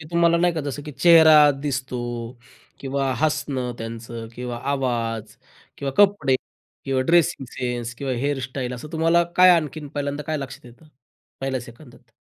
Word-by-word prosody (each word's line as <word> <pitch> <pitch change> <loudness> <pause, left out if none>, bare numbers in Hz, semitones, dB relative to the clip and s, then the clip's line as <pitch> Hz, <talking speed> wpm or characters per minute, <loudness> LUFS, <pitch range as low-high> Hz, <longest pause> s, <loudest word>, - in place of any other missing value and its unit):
की 150 - -10
तुम्हाला 170 0 +3
नाही 175 0 +2
का, 160 - -2
जसं 145 0 -5
की 150 - -8
चेहरा 155 +1 +7
दिसतो 130 -3 -3 0.8
किंवा 135 0 -1
हसणं, 145 -5 -1
त्यांचं 115 0 -7
किंवा 125 -1 -5
आवाज, 115 -5 -2 0.4
किंवा 135 -1 -3
कपडे, 195 -10 +4 0.5
किंवा 135 -1 0
ड्रेसिंग 170 -5 +2
सेन्स, 120 -1 -4
किंवा 135 +1 -4
हेअर 140 +3 -1
स्टाईल. 125 -1 -4
असं 125 +5 -9
तुम्हाला 165 +1 +3
काय 185 0 +8
आणखीन 155 -2 -4
पहिल्यांदा 145 0 -4
काय 155 - -1
लक्षात 135 -2 -8
येतं 125 +6 -17 0.5
पहिल्या 135 -1 -2
सेकंदात? 120 0 -15
135 Hz, 150 wpm, -23 LUFS, 125-155 Hz, 0.8 s, काय